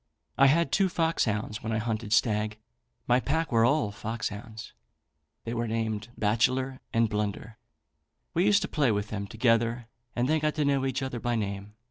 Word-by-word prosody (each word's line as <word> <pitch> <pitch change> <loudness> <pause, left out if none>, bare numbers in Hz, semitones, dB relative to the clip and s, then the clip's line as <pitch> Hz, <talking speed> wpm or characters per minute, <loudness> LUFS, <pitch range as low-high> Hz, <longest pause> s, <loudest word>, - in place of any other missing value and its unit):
"I 135 - +6
had 165 +5 +3
two 195 -1 +3
foxhounds 110 -12 0
when 110 - -3
I 110 - +1
hunted 110 -1 -3
stag, 105 -1 +2 0.5
my 125 +1 +4
pack 160 +4 -1
were 115 -1 +4
all 135 -3 +2
foxhounds, 110 +1 -6 0.7
they 115 - -4
were 120 0 -1
named 110 -1 -2
Bachelor 130 +5 +1
and 115 0 +3
Blunder. 105 +1 -3 0.7
We 175 - +2
used 205 -1 +4
to - - -2
play 140 -6 +2
with 105 0 -1
them 100 -2 -4
together, 115 +1 +1 0.3
and 120 +1 +1
they 155 +2 +2
got 150 0 0
to 150 -2 +1
know 135 -1 +2
each 135 0 -2
other 130 -2 -3
by 120 +1 -1
name. 100 -1 -4
115 Hz, 175 wpm, -28 LUFS, 110-135 Hz, 0.7 s, I